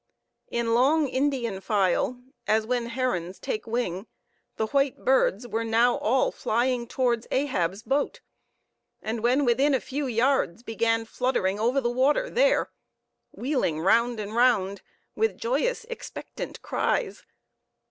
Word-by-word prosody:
In 235 -1 0
long 285 +6 +3
Indian 260 -7 -1
file, 205 +4 +1 0.3
as 220 0 +2
when 240 0 -1
herons 230 -8 -2
take 215 +1 -4
wing, 225 -4 -2 0.5
the 220 - 0
white 275 +3 0
birds 250 -3 +2
were 230 -1 -2
now 230 +2 +3
all 255 +5 +2
flying 240 +1 0
towards 240 -2 0
Ahab's 205 -8 -1
boat; 275 +3 -1 0.8
and 220 +1 -3
when 255 +5 +2
within 270 +4 +3
a - - +1
few 275 +1 -4
yards 240 -5 +1
began 225 0 0
fluttering 225 -5 -1
over 245 +5 +2
the 240 -3 0
water 285 - +2
there, - - +2 0.6
wheeling 250 - -1
round 230 +7 +2
and 210 0 -5
round, 215 -6 +2 0.3
with 445 0 0
joyous, 485 0 -1
expectant 475 0 -8
cries. 430 -5 -1
240 Hz, 130 wpm, -26 LUFS, 220-270 Hz, 0.8 s, long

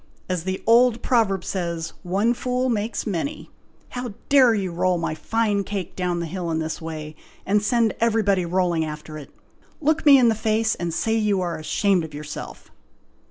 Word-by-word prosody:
As 180 -2 -2
the 190 0 -3
old 235 +1 +4
proverb 200 -7 +2
says, 170 -3 -3
'one 195 +6 +1
fool 250 +1 -1
makes 220 0 -2
many.' 220 - -4 0.4
How 245 -4 -6
dare 260 -5 +6
you 190 -3 -2
roll 180 +1 +1
my 165 -2 -2
fine 205 +5 0
cake 195 -3 -5
down 180 -2 -1
the 170 - -2
hill 175 +1 -4
in 160 - 0
this 160 +1 -3
way, 155 -1 -6 0.3
and 205 +2 +2
send 230 +1 +2
everybody 215 -5 +2
rolling 175 -1 +1
after 155 0 -7
it? 145 - -11 0.5
Look 310 +1 +1
me 285 -2 +8
in 250 -2 +5
the 225 - +4
face, 220 +1 +1
and 170 -1 -3
say 220 +7 0
you 210 -3 +1
are 175 -2 -2
ashamed 180 +4 +1
of 155 -2 -8
yourself!" 150 0 -8
195 Hz, 180 wpm, -23 LUFS, 170-225 Hz, 0.5 s, me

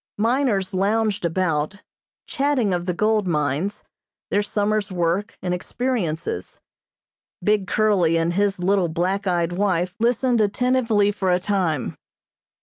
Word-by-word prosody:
Miners 220 -4 +1
lounged 205 +1 +1
about, 170 +1 -1 0.4
chatting 270 -8 0
of 175 0 -2
the 180 - +1
gold 215 0 +1
mines, 150 +5 -1 0.5
their 205 - +3
summer's 205 0 -1
work 180 +4 -1
and 180 -1 -1
experiences. 175 - -3 0.8
Big 210 -1 +2
Curly 190 -7 +2
and 165 +1 0
his 200 +1 +1
little 185 0 +1
black 185 +5 -1
eyed 175 -2 +1
wife 180 -1 0
listened 240 0 +2
attentively 225 -1 +2
for 190 -3 -1
a 180 - +3
time. 180 - -1
195 Hz, 125 wpm, -22 LUFS, 175-215 Hz, 0.8 s, their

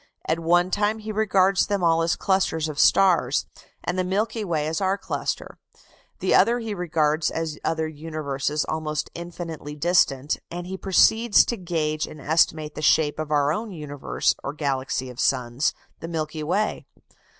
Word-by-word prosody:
At 160 +1 +1
one 175 +2 +2
time 210 +2 +1
he 215 0 -6
regards 195 -2 +2
them 200 -3 -1
all 165 -1 +3
as 165 0 +1
clusters 185 -5 0
of 150 -1 -5
stars, 170 -9 +4 0.4
and 180 +1 -2
the - - +2
Milky 210 +4 -1
Way 160 -6 -1
as 160 +4 -2
our 190 +1 +1
cluster; - - -4 0.6
the - - 0
others 235 0 +4
he 220 -2 -3
regards 155 -4 +1
as 160 -2 -4
other 160 -1 0
universes 150 -2 -3
almost 155 -1 -3
infinitely 165 -3 -7
distant; 150 -4 +2
and 175 +1 -6
he 190 +1 -5
proceeds 215 +4 +4
to 235 - -2
gauge 160 -5 -2
and 155 - -11
estimate 155 0 +1
the - - -6
shape 150 0 +3
of 155 -1 -3
our 145 0 +2
own 220 +5 -4
universe 150 -5 -1
or 140 - -4
galaxy 135 -3 -2
of 125 - -13
suns, 125 +1 +1 0.3
the 165 - -6
Milky 155 -2 -3
Way. 190 +8 -1
160 Hz, 165 wpm, -24 LUFS, 150-185 Hz, 0.6 s, stars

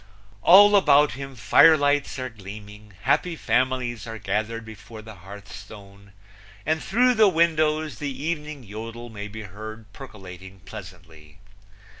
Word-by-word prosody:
All 205 - +7
about 150 -6 +4
him 135 +1 -8
firelights 145 +5 +4
are 130 -1 -4
gleaming, 105 -1 -12
happy 180 -2 +1
families 125 -5 -1
are 115 0 -6
gathered 110 +3 -3
before 110 0 -12
the 110 0 -11
hearthstone, 100 +1 -13 0.5
and 160 +1 0
through 250 +5 +2
the 215 -3 +5
windows 155 -4 0
the 145 - -3
evening 150 0 -5
yodel 115 +3 -9
may 105 -1 -7
be 110 +1 -9
heard 110 +2 -10
percolating 95 -6 -12
pleasantly. 80 -5 -13
115 Hz, 125 wpm, -24 LUFS, 100-145 Hz, 0.5 s, All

